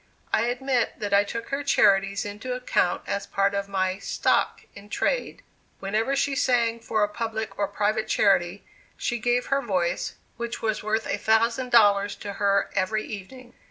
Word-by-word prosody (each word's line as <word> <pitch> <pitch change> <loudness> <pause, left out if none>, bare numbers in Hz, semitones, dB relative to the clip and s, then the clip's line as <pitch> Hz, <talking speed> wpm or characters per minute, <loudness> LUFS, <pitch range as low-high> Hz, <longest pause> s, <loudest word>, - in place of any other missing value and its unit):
I 225 - +3
admit 250 0 0
that 205 -1 -3
I 200 0 +6
took 230 +3 -6
her 280 +1 -2
charities 200 -7 +3
into 210 +5 -5
account 250 -7 0
as 200 0 -3
part 200 0 +1
of 200 0 -2
my 190 -1 -1
"stock - - 0
in 205 +1 -13
trade." - - -1 0.4
Whenever 215 +7 0
she 275 0 0
sang 235 -3 +2
for 220 -2 0
a - - +3
public 220 -1 -4
or 200 - +1
private 210 +2 -1
charity, 195 -2 +2 0.3
she 240 - -2
gave 245 +2 +1
her 275 - +2
voice, 180 -7 -1 0.2
which 235 0 -4
was 220 -1 -1
worth 215 +1 -1
a - - -2
thousand 230 +3 +2
dollars 205 -4 +4
to 205 -1 -7
her 200 0 +2
every 215 +3 0
evening. 240 +4 -9
215 Hz, 170 wpm, -25 LUFS, 200-240 Hz, 0.4 s, I